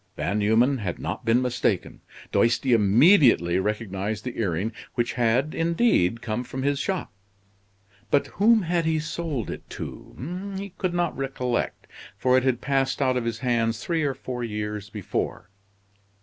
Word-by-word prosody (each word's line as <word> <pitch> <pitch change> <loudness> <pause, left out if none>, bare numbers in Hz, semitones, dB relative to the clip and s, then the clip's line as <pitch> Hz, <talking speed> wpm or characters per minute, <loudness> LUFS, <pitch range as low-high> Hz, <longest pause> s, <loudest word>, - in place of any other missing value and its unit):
Van 100 +3 -1
Numen 115 +6 +3
had 90 -5 -3
not 90 +9 -5
been 115 +3 +3
mistaken. 120 -6 -1 0.3
Doisty 120 +2 +3
immediately 110 - +5
recognized 105 0 -2
the 125 - -5
earring, 100 +1 -1 0.2
which 120 0 0
had, 125 +5 +1
indeed, 165 - +2
come 115 +1 -2
from 130 +1 -5
his 140 0 +1
shop. 190 +2 -2 1.0
But 145 - +3
whom 220 +2 +3
had 170 -1 0
he 160 0 +2
sold 155 -5 -3
it - - -9
to? 185 +8 -7
He 200 +1 -5
could 180 -2 -1
not 175 -2 0
recollect, 130 -3 -2 0.3
for 125 +4 +3
it 130 - +4
had 130 -2 +1
passed 135 -1 0
out 130 -2 +2
of 125 -2 -1
his 115 -1 -2
hands 115 -2 +1
three 165 -2 0
or 140 -3 0
four 125 -1 -5
years 105 -2 -4
before. 100 -1 -4
125 Hz, 155 wpm, -25 LUFS, 110-150 Hz, 1.0 s, immediately